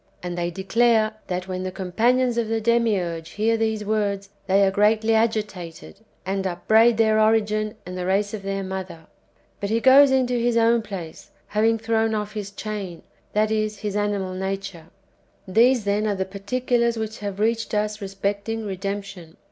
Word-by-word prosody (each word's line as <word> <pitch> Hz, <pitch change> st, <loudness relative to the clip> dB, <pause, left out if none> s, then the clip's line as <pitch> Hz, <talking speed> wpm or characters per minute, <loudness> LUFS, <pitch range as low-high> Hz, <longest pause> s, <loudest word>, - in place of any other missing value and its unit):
And 175 Hz, -1 st, -4 dB
they 175 Hz, 0 st, -1 dB
declare, 215 Hz, +4 st, +2 dB, 0.2 s
that 180 Hz, 0 st, -3 dB
when 185 Hz, -1 st, -4 dB
the 185 Hz, 0 st, -3 dB
companions 235 Hz, +7 st, +1 dB
of 235 Hz, -2 st, 0 dB
the 225 Hz, 0 st, 0 dB
Demiurge 205 Hz, -8 st, 0 dB
hear 225 Hz, +2 st, +1 dB
these 220 Hz, -1 st, -1 dB
words, 200 Hz, -2 st, -1 dB, 0.2 s
they 195 Hz, +1 st, +4 dB
are 190 Hz, -, +2 dB
greatly 215 Hz, +3 st, +3 dB
agitated, 210 Hz, -6 st, -2 dB, 0.3 s
and 195 Hz, 0 st, -1 dB
upbraid 220 Hz, +6 st, +3 dB
their 220 Hz, -1 st, +3 dB
origin 215 Hz, -1 st, +2 dB
and 180 Hz, +1 st, -7 dB
the 180 Hz, 0 st, -3 dB
race 200 Hz, +2 st, +1 dB
of 215 Hz, -, -4 dB
their 195 Hz, 0 st, -3 dB
mother. 185 Hz, -4 st, -6 dB, 0.5 s
But 200 Hz, -, -3 dB
he 225 Hz, +1 st, +1 dB
goes 270 Hz, +3 st, +7 dB
into 250 Hz, -2 st, +1 dB
his 235 Hz, 0 st, +1 dB
own 230 Hz, 0 st, +4 dB
place, 190 Hz, -7 st, -8 dB, 0.2 s
having 225 Hz, +2 st, +2 dB
thrown 225 Hz, 0 st, 0 dB
[off] 210 Hz, 0 st, -3 dB
his 210 Hz, -2 st, -5 dB
chain, 200 Hz, -4 st, -6 dB, 0.3 s
tliat 215 Hz, +1 st, +2 dB
is, 215 Hz, -1 st, -1 dB
his 205 Hz, -1 st, -4 dB
animal 205 Hz, -3 st, -1 dB
nature. 190 Hz, -3 st, -5 dB, 0.6 s
These, 235 Hz, +5 st, +4 dB
then, 205 Hz, +1 st, 0 dB
are 205 Hz, -, 0 dB
the 190 Hz, 0 st, -2 dB
particulars 235 Hz, +4 st, -1 dB
which 220 Hz, 0 st, -4 dB
have 200 Hz, -1 st, -5 dB
reached 225 Hz, 0 st, 0 dB
us 210 Hz, +1 st, -1 dB
respecting 200 Hz, +3 st, -3 dB
redemption. 195 Hz, -3 st, -6 dB
210 Hz, 170 wpm, -23 LUFS, 195-225 Hz, 0.6 s, goes